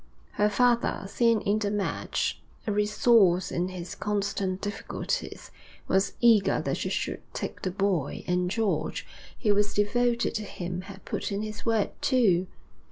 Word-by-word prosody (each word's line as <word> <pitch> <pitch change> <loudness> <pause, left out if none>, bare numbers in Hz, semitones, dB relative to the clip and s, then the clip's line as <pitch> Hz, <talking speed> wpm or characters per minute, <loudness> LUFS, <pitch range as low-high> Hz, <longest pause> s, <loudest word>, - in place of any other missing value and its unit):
Her 210 0 +2
father, 235 -2 +2
seeing 230 +1 +2
in 205 +2 +1
the 205 -2 0
match 205 -1 -1 0.2
a 215 - 0
resource 210 -3 +4
in 175 +1 0
his 180 -1 -6
constant 200 -2 -1
difficulties, 205 0 -4 0.4
was 190 +1 +2
eager 230 -4 +5
that - - -1
she - - -2
should - - -2
take - - -4
the 185 - -1
boy, 185 -6 -1
and 180 0 +1
George, 185 -7 -1 0.4
who 210 -3 +4
was 205 0 +1
devoted 235 +3 +1
to 215 -2 -2
him, 180 -2 -5
had 195 0 -11
put - - -3
in 200 +1 -2
his 215 -1 -6
word, 225 -3 +2
too. 195 -9 +3
205 Hz, 155 wpm, -27 LUFS, 185-215 Hz, 0.4 s, eager